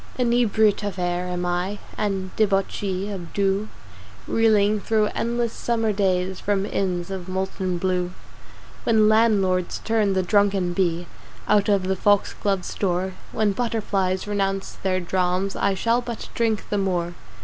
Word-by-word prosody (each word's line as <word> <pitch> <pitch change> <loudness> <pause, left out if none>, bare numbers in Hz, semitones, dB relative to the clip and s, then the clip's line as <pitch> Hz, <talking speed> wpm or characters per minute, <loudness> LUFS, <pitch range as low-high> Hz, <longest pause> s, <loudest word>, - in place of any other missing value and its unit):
Inebriate 235 -4 +3
of 205 -2 -4
Air 175 0 -1
am 180 0 -2
I 180 +3 -1 0.2
And 195 -3 -2
Debauchee 195 -1 0
of 180 -4 -7
Dew 200 +1 0 0.6
Reeling 215 -2 +3
thro 215 0 +1
endless 235 0 -1
summer 225 -2 0
days 190 -2 0
From 200 -1 0
inns 185 -3 -2
of 185 -1 -5
Molten 190 -1 -2
Blue 180 0 0 0.7
When 220 -2 +4
"Landlords" 205 -5 +3
turn 220 -3 +2
the 190 -1 +1
drunken 195 -2 +2
Bee 175 -2 0 0.4
Out 210 0 +3
of 200 -2 +3
the 190 +1 0
Foxglove's 200 -1 +1
door 185 -1 -1 0.2
When 215 -2 +1
Butterflies 200 -4 -1
renounce 195 -1 -1
their 185 -1 -1
"drams" 185 +2 0
I 200 -1 +1
shall 230 +5 +1
but 235 -2 -6
drink 225 -3 0
the 205 - 0
more! 175 -3 -1
195 Hz, 140 wpm, -23 LUFS, 185-210 Hz, 0.7 s, When